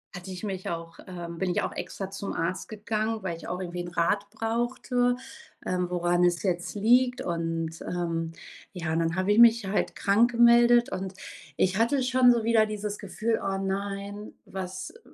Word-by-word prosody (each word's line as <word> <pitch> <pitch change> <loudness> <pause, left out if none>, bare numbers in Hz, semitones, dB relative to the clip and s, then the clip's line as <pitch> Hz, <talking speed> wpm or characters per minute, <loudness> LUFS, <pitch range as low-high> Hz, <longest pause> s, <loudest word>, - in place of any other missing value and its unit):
hatte 180 +1 -8
ich 185 +2 -7
mich 190 -3 -4
auch, 165 -1 -6
ähm 170 -2 -7
bin 190 -1 0
ich - - 0
auch - - -2
extra 195 -1 -5
zum 195 0 -5
Arzt 170 +6 -2
gegangen, 215 0 -2
weil 170 -3 -2
ich - - -10
auch 180 +1 -3
irgendwie 175 -1 -4
'nen 175 - -7
Rat 200 +4 +1
brauchte, 240 +3 0 0.5
ähm, 180 -1 -1
woran 175 0 +1
es 175 -1 +2
jetzt 175 0 -1
liegt 245 +4 +3
und, 165 -1 -3
ähm, 165 -2 -2 0.4
ja, 165 -3 -2
dann 165 0 0
habe 185 +2 +1
ich 210 - +4
mich 230 -2 +7
halt 195 +2 -1
krank 215 +5 +3
gemeldet 240 +1 +5
und 190 0 -4 0.4
ich 185 +1 +2
hatte 260 +3 +2
schon 255 -1 +5
so 235 -2 +1
wieder 220 -1 +4
dieses 210 -1 -4
Gefühl: 220 +3 -1
„Oh 195 -1 -1
nein, 200 +1 -4
was, 185 -1 -6
äh“ 460 - -18
195 Hz, 180 wpm, -27 LUFS, 175-225 Hz, 0.5 s, mich